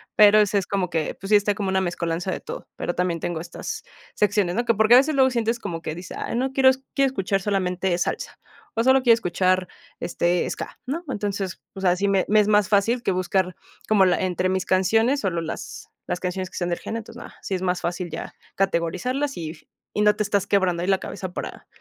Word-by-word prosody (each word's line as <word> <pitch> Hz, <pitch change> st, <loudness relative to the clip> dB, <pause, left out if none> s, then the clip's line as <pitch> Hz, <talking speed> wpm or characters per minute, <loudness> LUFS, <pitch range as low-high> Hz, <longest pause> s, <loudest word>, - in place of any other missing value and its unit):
Pero, 210 Hz, 0 st, +7 dB
ese 205 Hz, -1 st, +3 dB
es 185 Hz, -, -5 dB
como 195 Hz, -3 st, -1 dB
que, 160 Hz, -2 st, -1 dB
pues 195 Hz, -, -7 dB
sí, 210 Hz, -, +6 dB
está 205 Hz, 0 st, 0 dB
como 200 Hz, -3 st, -2 dB
una 190 Hz, 0 st, +2 dB
mezcolanza 175 Hz, +1 st, -2 dB
de -, -, -4 dB
todo. -, -, -8 dB
Pero 175 Hz, -, -3 dB
también 180 Hz, -2 st, -1 dB
tengo 170 Hz, 0 st, -3 dB
estas 170 Hz, +1 st, -6 dB, 0.3 s
secciones, 205 Hz, -3 st, +1 dB
¿no?, 240 Hz, -, 0 dB
que 230 Hz, -, +3 dB
porque 220 Hz, +3 st, +5 dB
a -, -, +10 dB
veces 285 Hz, +3 st, +3 dB
luego 265 Hz, -1 st, +4 dB
sientes 235 Hz, -1 st, 0 dB
como 165 Hz, -5 st, -5 dB
que 155 Hz, -, -4 dB
dices: 175 Hz, +1 st, -8 dB
"Ay -, -, -3 dB
no 260 Hz, +2 st, 0 dB
quiero 265 Hz, -1 st, +5 dB, 0.2 s
quiero 275 Hz, -1 st, +3 dB
escuchar 195 Hz, -5 st, -1 dB
solamente 185 Hz, -2 st, 0 dB
salsa, -, -, -3 dB, 0.4 s
o 230 Hz, -, +2 dB
solo 260 Hz, +1 st, +5 dB
quiero 240 Hz, -2 st, +6 dB
escuchar, 185 Hz, -3 st, +1 dB, 0.3 s
este, 175 Hz, 0 st, 0 dB
ska", -, -, -6 dB
¿no?, 310 Hz, +7 st, -3 dB
entonces, 200 Hz, -4 st, -3 dB
o 190 Hz, -, -8 dB
sea, 180 Hz, -1 st, +3 dB
sí 200 Hz, +2 st, 0 dB
me 195 Hz, -1 st, +2 dB
me 215 Hz, +1 st, +4 dB
es 205 Hz, -, 0 dB
más 210 Hz, -2 st, +4 dB
fácil 220 Hz, +4 st, +2 dB
que 195 Hz, -, 0 dB
buscar 185 Hz, 0 st, 0 dB, 0.3 s
como 205 Hz, -3 st, +5 dB
la 180 Hz, -, +2 dB
entre 185 Hz, 0 st, 0 dB
mis 190 Hz, 0 st, -1 dB
canciones, 225 Hz, +9 st, +2 dB
solo 175 Hz, -4 st, -1 dB
las 165 Hz, -, -6 dB, 0.2 s
las 180 Hz, -, -2 dB
canciones 185 Hz, 0 st, -3 dB
que -, -, -10 dB
sean 175 Hz, -1 st, -1 dB
de 175 Hz, -, +1 dB
gene, 230 Hz, -, -5 dB
entonces 220 Hz, -, -11 dB
nada, -, -, -12 dB
sí 190 Hz, -, -3 dB
es 185 Hz, -, -4 dB
más 180 Hz, -2 st, 0 dB
fácil 175 Hz, 0 st, -3 dB
ya -, -, -6 dB, 0.2 s
categorizarlas 195 Hz, -, -1 dB
y 160 Hz, -2 st, -4 dB, 0.4 s
y 210 Hz, -, 0 dB
no 210 Hz, 0 st, +5 dB
te 210 Hz, -, 0 dB
estás 200 Hz, -1 st, 0 dB
quebrando 180 Hz, -4 st, +1 dB
ahí -, -, -2 dB
la 190 Hz, -1 st, +3 dB
cabeza 185 Hz, -2 st, -6 dB
para -, -, -7 dB
195 Hz, 230 wpm, -24 LUFS, 180-215 Hz, 0.4 s, a